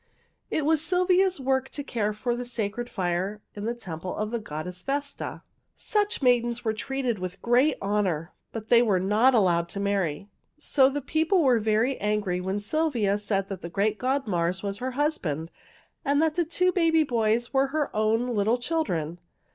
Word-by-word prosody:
"It 305 Hz, -, -1 dB
was 315 Hz, 0 st, +3 dB
Sylvia's 365 Hz, 0 st, +2 dB
work 265 Hz, 0 st, 0 dB
to 285 Hz, -, -6 dB
care 220 Hz, -6 st, -1 dB
for 235 Hz, +3 st, -2 dB
the 245 Hz, -, -4 dB
sacred 240 Hz, 0 st, -3 dB
fire 185 Hz, +3 st, -2 dB
in 205 Hz, 0 st, -6 dB
the 235 Hz, +1 st, -1 dB
temple 180 Hz, -5 st, -6 dB
of 215 Hz, +1 st, -2 dB
the 235 Hz, -, -1 dB
goddess 180 Hz, -1 st, -6 dB
Vesta. 280 Hz, +1 st, -4 dB, 0.3 s
Such 415 Hz, -7 st, 0 dB
maidens 240 Hz, -1 st, +2 dB
were 220 Hz, -, +1 dB
treated 250 Hz, -1 st, -2 dB
with 185 Hz, +1 st, -5 dB
great 255 Hz, +5 st, +3 dB
honor, 190 Hz, -5 st, -1 dB, 0.2 s
but 225 Hz, -1 st, -7 dB
they 235 Hz, -1 st, +7 dB
were 205 Hz, -6 st, +2 dB
not 215 Hz, +7 st, +3 dB
allowed 170 Hz, -5 st, +2 dB
to 200 Hz, -, -5 dB
marry. 195 Hz, -4 st, -1 dB, 0.3 s
So 275 Hz, -3 st, +3 dB
the 285 Hz, 0 st, -4 dB
people 320 Hz, +5 st, +2 dB
were 250 Hz, -4 st, +4 dB
very 220 Hz, +5 st, +1 dB
angry 205 Hz, -3 st, 0 dB
when 190 Hz, +2 st, -2 dB
Sylvia 225 Hz, -5 st, 0 dB
said 200 Hz, -2 st, -1 dB
the 185 Hz, -3 st, -6 dB
great 205 Hz, +3 st, 0 dB
god 265 Hz, +2 st, 0 dB
Mars 180 Hz, -1 st, -1 dB
was 200 Hz, 0 st, -3 dB
her 255 Hz, +1 st, -3 dB
husband 170 Hz, -, -1 dB, 0.5 s
and 285 Hz, 0 st, +2 dB
the 320 Hz, +2 st, +2 dB
two 365 Hz, +3 st, +2 dB
baby 330 Hz, -3 st, +3 dB
boys 235 Hz, -2 st, 0 dB
were 270 Hz, 0 st, +3 dB
her 295 Hz, -2 st, -2 dB
own 220 Hz, +3 st, +1 dB
little 215 Hz, +3 st, +2 dB
children. 180 Hz, -, -2 dB
230 Hz, 175 wpm, -26 LUFS, 200-275 Hz, 0.5 s, they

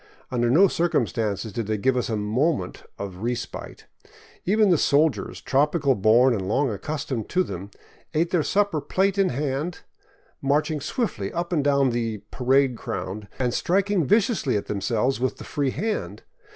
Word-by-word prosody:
Under 120 Hz, -1 st, +1 dB
no 175 Hz, +11 st, +6 dB
circumstances 115 Hz, -, -1 dB
did 115 Hz, -1 st, -3 dB
they 110 Hz, 0 st, 0 dB
give 130 Hz, +5 st, +1 dB
us 125 Hz, -, -1 dB
a 110 Hz, -, 0 dB
moment 110 Hz, -, -1 dB
of 95 Hz, -3 st, -6 dB
respite. 120 Hz, +3 st, -5 dB, 0.6 s
Even 210 Hz, +1 st, +4 dB
the 170 Hz, -, +5 dB
sol 150 Hz, +2 st, +4 dB
diers, -, -, -8 dB
tropical 145 Hz, 0 st, +2 dB
born 120 Hz, +4 st, +4 dB
and 95 Hz, -4 st, -2 dB
long 130 Hz, +5 st, +1 dB
accustomed 130 Hz, +2 st, -4 dB
to 185 Hz, 0 st, +2 dB
them, 95 Hz, -, -7 dB, 0.5 s
ate 165 Hz, +3 st, +1 dB
their 175 Hz, -, +3 dB
supper 200 Hz, -2 st, +1 dB
plate 195 Hz, +4 st, 0 dB
in 195 Hz, -, +4 dB
hand, 145 Hz, +5 st, -2 dB, 0.6 s
marching 150 Hz, +2 st, +1 dB
swiftly 130 Hz, -, -2 dB
up 175 Hz, +1 st, -3 dB
and 150 Hz, -4 st, +2 dB
down 140 Hz, -2 st, +3 dB
the 115 Hz, -3 st, -2 dB
" -, -, -47 dB
parade 130 Hz, 0 st, +2 dB
ground 95 Hz, 0 st, -5 dB
" -, -, -24 dB
and 125 Hz, -2 st, 0 dB
striking 195 Hz, +3 st, +1 dB
viciously 205 Hz, -, +2 dB
at 100 Hz, -, -4 dB
themselves 110 Hz, +6 st, 0 dB
with 130 Hz, 0 st, -1 dB
the -, -, -9 dB
free 145 Hz, -3 st, -1 dB
hand. 140 Hz, -, -3 dB
135 Hz, 170 wpm, -24 LUFS, 110-165 Hz, 0.6 s, no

